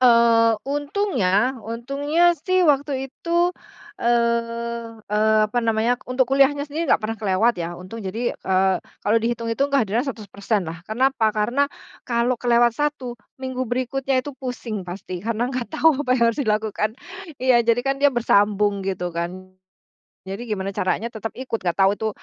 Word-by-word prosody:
Eee, 230 Hz, -2 st, +5 dB
untungnya 275 Hz, -, 0 dB
untungnya 280 Hz, +10 st, +1 dB
sih 365 Hz, +3 st, +1 dB
waktu 285 Hz, -1 st, +2 dB, 0.2 s
itu, 345 Hz, +3 st, +1 dB, 0.5 s
eee 235 Hz, -1 st, 0 dB, 0.2 s
eee, 215 Hz, +1 st, +3 dB
apa 215 Hz, +3 st, -1 dB
namanya, 230 Hz, +2 st, +1 dB
untuk 255 Hz, +1 st, +2 dB
kuliahnya 275 Hz, +1 st, +4 dB
sendiri 305 Hz, +1 st, -4 dB
nggak -, -, +3 dB
pernah 225 Hz, +1 st, -3 dB
kelewat 210 Hz, +4 st, +2 dB
ya, 170 Hz, -, -2 dB
untung. 185 Hz, +6 st, -9 dB
Jadi, 220 Hz, +5 st, -2 dB
eee, 190 Hz, 0 st, +1 dB, 0.3 s
kalau 215 Hz, +2 st, +3 dB
dihitung-hitung 230 Hz, +3 st, -1 dB
kehadiran 235 Hz, -6 st, +1 dB
100% 215 Hz, -5 st, -3 dB
lah, 165 Hz, 0 st, -7 dB
karena 260 Hz, +5 st, +2 dB
apa? 225 Hz, -5 st, +1 dB
Karena 240 Hz, +7 st, +1 dB, 0.5 s
kalau 235 Hz, 0 st, +1 dB
kelewat 240 Hz, -1 st, +4 dB
1, 290 Hz, -1 st, -2 dB, 0.2 s
minggu 260 Hz, -1 st, -4 dB
berikutnya 255 Hz, +1 st, -1 dB
itu 290 Hz, -, -6 dB
pusing 230 Hz, -7 st, -5 dB
pasti 180 Hz, -1 st, -6 dB
karena 230 Hz, +4 st, -2 dB
nggak 250 Hz, -2 st, -3 dB
tahu 315 Hz, -2 st, +3 dB
apa 270 Hz, -3 st, -3 dB
yang 235 Hz, -, +1 dB
harus 260 Hz, -, -4 dB
dilakukan. 215 Hz, -3 st, 0 dB, 0.5 s
Iya, 255 Hz, -2 st, +4 dB
jadi 235 Hz, +1 st, +2 dB
kan 275 Hz, 0 st, -1 dB
dia 285 Hz, -, +6 dB
bersambung 205 Hz, -5 st, +2 dB
gitu 185 Hz, -2 st, -3 dB
kan. 180 Hz, +3 st, -5 dB, 0.8 s
Jadi 195 Hz, +5 st, -5 dB
gimana 205 Hz, -4 st, -3 dB
caranya 190 Hz, +5 st, 0 dB
tetep 225 Hz, -1 st, -6 dB
ikut, 255 Hz, -3 st, -2 dB
enggak 175 Hz, 0 st, -1 dB
tahu 195 Hz, 0 st, +6 dB
itu 220 Hz, -, -2 dB
235 Hz, 155 wpm, -22 LUFS, 210-265 Hz, 0.8 s, dia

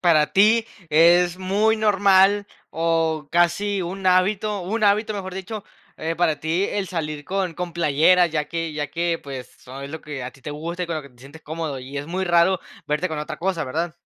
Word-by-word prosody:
para 155 Hz, -4 st, +3 dB
ti 220 Hz, +4 st, +5 dB, 0.3 s
es 175 Hz, +3 st, +5 dB
muy 205 Hz, +4 st, +2 dB
normal, 200 Hz, -1 st, +4 dB, 0.2 s
o 160 Hz, -2 st, 0 dB
casi 190 Hz, +4 st, +2 dB
un 190 Hz, +2 st, -5 dB
hábito, 195 Hz, +3 st, +2 dB
un 215 Hz, +5 st, -1 dB
hábito, 210 Hz, +2 st, +3 dB
mejor 190 Hz, -3 st, -5 dB
dicho, 195 Hz, +2 st, -6 dB, 0.3 s
eh, 160 Hz, +1 st, -3 dB
para 165 Hz, -2 st, +1 dB
ti 165 Hz, +5 st, 0 dB
el 200 Hz, -2 st, -2 dB
salir 155 Hz, -4 st, -4 dB
con 185 Hz, -1 st, -2 dB
con 180 Hz, 0 st, -4 dB
playeras, 170 Hz, +2 st, +4 dB
ya 155 Hz, -1 st, -1 dB
que 165 Hz, -1 st, -3 dB
ya 150 Hz, -1 st, -2 dB
que, 170 Hz, +2 st, -1 dB
pues, 135 Hz, -3 st, -10 dB
es 135 Hz, +2 st, -8 dB
lo 160 Hz, +1 st, -6 dB
que 145 Hz, -3 st, -7 dB
a 125 Hz, -, -5 dB
ti 135 Hz, -, -21 dB
te 145 Hz, -, -6 dB
gusta 170 Hz, +4 st, -4 dB
y -, -, -10 dB
con 170 Hz, -, -3 dB
lo 155 Hz, -, -4 dB
que 140 Hz, -, -13 dB
te 125 Hz, -, -26 dB
sientes 140 Hz, +5 st, -14 dB
cómodo 155 Hz, -3 st, -4 dB
y 135 Hz, +3 st, -6 dB
es 145 Hz, -, -6 dB
muy 185 Hz, +3 st, -2 dB
raro 175 Hz, +1 st, +3 dB, 0.3 s
verte 150 Hz, +5 st, 0 dB
con 155 Hz, -, -4 dB
otra 150 Hz, +1 st, -5 dB
cosa, 175 Hz, -2 st, -1 dB
¿verdad? 160 Hz, +6 st, -2 dB
170 Hz, 210 wpm, -23 LUFS, 155-190 Hz, 0.3 s, ti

